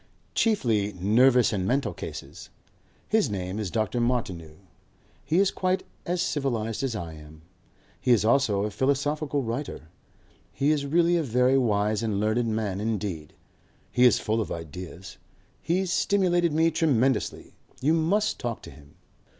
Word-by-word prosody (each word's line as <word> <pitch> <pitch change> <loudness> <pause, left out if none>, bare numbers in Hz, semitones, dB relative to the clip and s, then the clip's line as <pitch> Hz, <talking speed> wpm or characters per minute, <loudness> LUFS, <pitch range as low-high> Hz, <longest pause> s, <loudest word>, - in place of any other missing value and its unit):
Chiefly 115 - +1
nervous 120 +7 +4
and 95 -2 -1
mental 135 +4 0
cases. - - -8 0.6
His 215 - +2
name 95 0 -4
is 105 -4 -3
Dr. 110 +5 -1
Martineau. 95 -10 -2 0.7
He 160 - 0
is 195 0 +4
quite 185 0 -1 0.2
as 175 0 0
civilized 115 -6 -2
as 135 -4 -2
I 85 -6 -5
am. 75 0 -14 0.6
He - - -3
is 110 -4 +4
also 115 -5 +2
a 105 - -2
philosophical 140 +3 0
writer. 115 - -5 0.6
He 140 +2 +1
is 145 -2 0
really 170 +3 +3
a - - +1
very 125 -1 +2
wise 105 -3 +1
and 110 -3 -1
learned 110 +3 +1
man 110 -3 -2
indeed. 100 -8 -3 0.6
He 125 - +2
is 125 - +6
full 110 +1 -1
of - - -5
ideas. 90 +4 -8 0.4
He's 180 +2 0
stimulated 175 -4 +2
me 160 +2 +3
tremendously. 135 -6 0 0.3
You 150 +5 +2
must 190 +7 +1
talk 120 -2 -4
to - - -10
him." 70 -1 -17
120 Hz, 150 wpm, -26 LUFS, 105-150 Hz, 0.7 s, is